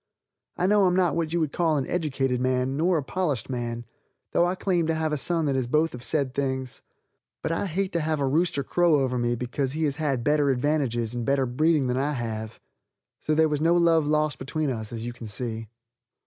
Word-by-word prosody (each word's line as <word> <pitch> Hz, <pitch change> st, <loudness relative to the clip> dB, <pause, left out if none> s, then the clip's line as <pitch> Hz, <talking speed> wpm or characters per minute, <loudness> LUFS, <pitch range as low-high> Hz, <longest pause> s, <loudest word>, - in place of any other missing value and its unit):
I 180 Hz, -, +1 dB
know 205 Hz, 0 st, +4 dB
I'm 180 Hz, -1 st, +3 dB
not 180 Hz, -4 st, +2 dB
what 165 Hz, -2 st, -1 dB
you 170 Hz, -, +1 dB
would 155 Hz, -3 st, 0 dB
call 165 Hz, -3 st, +1 dB
an 135 Hz, -, -1 dB
educated 135 Hz, -7 st, -1 dB
man 130 Hz, +1 st, 0 dB
nor 170 Hz, +4 st, +2 dB
a 150 Hz, -, -1 dB
polished 140 Hz, -, -2 dB
man, 120 Hz, -1 st, -4 dB, 0.5 s
though 175 Hz, -, +3 dB
I 180 Hz, -, -1 dB
claim 180 Hz, -4 st, 0 dB
to 165 Hz, -, +1 dB
have 160 Hz, -1 st, -1 dB
a -, -, +2 dB
son 165 Hz, +3 st, +1 dB
that 140 Hz, -2 st, +1 dB
is 130 Hz, -2 st, 0 dB
both 155 Hz, +5 st, +1 dB
of 125 Hz, -, -7 dB
said 140 Hz, -4 st, 0 dB
things, 130 Hz, -2 st, -3 dB, 0.6 s
but -, -, -1 dB
I 165 Hz, +4 st, -1 dB
hate 190 Hz, +3 st, -1 dB
to 170 Hz, -, +1 dB
have 155 Hz, -1 st, -1 dB
a 140 Hz, -, +1 dB
rooster 145 Hz, +1 st, +1 dB
crow 175 Hz, +2 st, +3 dB
over 125 Hz, -2 st, 0 dB
me 120 Hz, 0 st, +1 dB
because 125 Hz, +3 st, -2 dB
he 160 Hz, +1 st, -2 dB
has 145 Hz, -2 st, 0 dB
had 140 Hz, -6 st, -1 dB
better 145 Hz, 0 st, +2 dB
advantages 125 Hz, -4 st, 0 dB
and 120 Hz, -1 st, -3 dB
better 135 Hz, +1 st, +1 dB
breeding 150 Hz, +3 st, +2 dB
than 125 Hz, 0 st, 0 dB
I 145 Hz, +3 st, 0 dB
have. 110 Hz, -3 st, -5 dB, 0.6 s
So 155 Hz, -, 0 dB
there 160 Hz, 0 st, +4 dB
was 150 Hz, -1 st, -1 dB
no 165 Hz, +2 st, +4 dB
love 165 Hz, -3 st, +3 dB
lost 150 Hz, -1 st, +1 dB
between 145 Hz, +2 st, -2 dB
us, 110 Hz, -3 st, -5 dB
as 115 Hz, -1 st, -5 dB
you 120 Hz, -, -4 dB
can 120 Hz, -1 st, -9 dB
see. 110 Hz, +1 st, -4 dB
145 Hz, 230 wpm, -26 LUFS, 125-160 Hz, 0.6 s, know